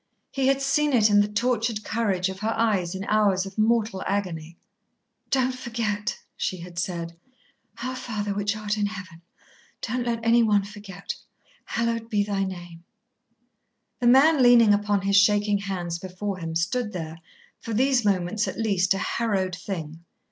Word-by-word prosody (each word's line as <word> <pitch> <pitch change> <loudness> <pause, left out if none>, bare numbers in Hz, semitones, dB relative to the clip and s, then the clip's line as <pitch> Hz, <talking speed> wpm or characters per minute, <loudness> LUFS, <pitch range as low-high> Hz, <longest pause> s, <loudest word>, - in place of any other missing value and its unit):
He 270 -1 0
had 275 0 +2
seen 295 +1 +2
it 215 -3 +4
in 205 - +6
the 205 - +1
tortured 225 0 0
courage 200 -5 0
of 190 0 -6
her 220 +2 -1
eyes 195 -6 +1
in 190 - -4
hours 200 -3 +2
of 195 0 -9
mortal 220 -3 +2
agony. 170 -5 -3 0.7
"Don't 260 -1 +2
forget," 225 -4 -3 0.2
she 185 - -2
had 175 0 -7
said. 170 -2 -3 0.7
"Our 255 0 -3
Father 210 -5 -3
which 205 +1 -1
art 215 0 -2
in 205 - +1
Heaven. 185 -5 -9 0.6
Don't 245 +2 -2
let 230 -1 0
anyone 225 -3 +4
forget. 200 -1 -7 0.5
Hallowed 230 -1 -2
be 205 -2 +2
thy 200 -1 -1
name." 175 -3 -8 1.2
The 245 - +1
man, 275 +4 +6
leaning 240 -4 +7
upon 205 -1 +1
his 200 +1 +2
shaking 205 0 +4
hands 180 -4 -4
before 185 +2 -5
him, 165 -1 -5
stood 210 +7 -1
there, 165 -2 -6 0.4
for 230 - -5
these 260 +1 +3
moments 200 +1 0
at - - -5
least, 195 -4 +2
a - - -2
harrowed 195 -4 -1
thing. 165 -4 -6
205 Hz, 160 wpm, -25 LUFS, 185-230 Hz, 1.2 s, leaning